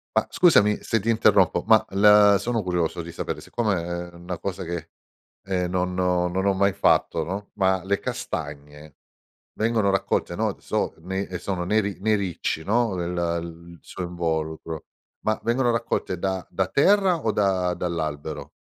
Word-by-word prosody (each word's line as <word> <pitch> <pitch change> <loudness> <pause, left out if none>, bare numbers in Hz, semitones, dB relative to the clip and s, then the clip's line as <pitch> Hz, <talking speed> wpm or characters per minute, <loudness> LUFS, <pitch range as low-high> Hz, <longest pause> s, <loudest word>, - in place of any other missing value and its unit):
Ma - - +2
scusami 105 - +4
se 115 - +1
ti 115 +4 -3
interrompo, 115 -1 +3
ma - - +5
la 105 0 +6
sono 115 0 -1
curioso 90 -2 -1
di 85 +1 -8
sapere, - - -5
siccome 105 -7 -1 0.3
è - - -25
una 85 +1 -6
cosa 95 0 -4
che, 85 -2 -5 0.6
ehm, 90 -2 -1
non 90 0 -1
ho 90 -1 +2
non 95 +2 -1
ho 100 - +4
mai 100 +1 +2
fatto, 90 -3 +2
no, 95 +5 -5
ma 95 -2 +1
le 100 +1 0
castagne 75 -1 -6 0.6
vengono 110 -2 +1
raccolte, 95 - 0
no, - - -1
so - - -2
nei 95 +3 -4
sono 90 -1 -3
nei 110 +4 +2
ri 100 -2 -4
nei 110 +2 +2
ricci, 90 -4 -3
no, 115 0 +1
il 85 -1 -1
il 85 0 -11
suo 90 - -7
involucro, 80 -2 -3 0.4
ma 110 0 +1
vengono 120 +1 +1
raccolte 115 -5 -2
da 95 0 -2
da 95 -1 -1
terra, 190 - +4
o 110 - +1
da 95 -4 +1
dall'albero? 80 -4 -4
95 Hz, 165 wpm, -24 LUFS, 85-105 Hz, 0.6 s, la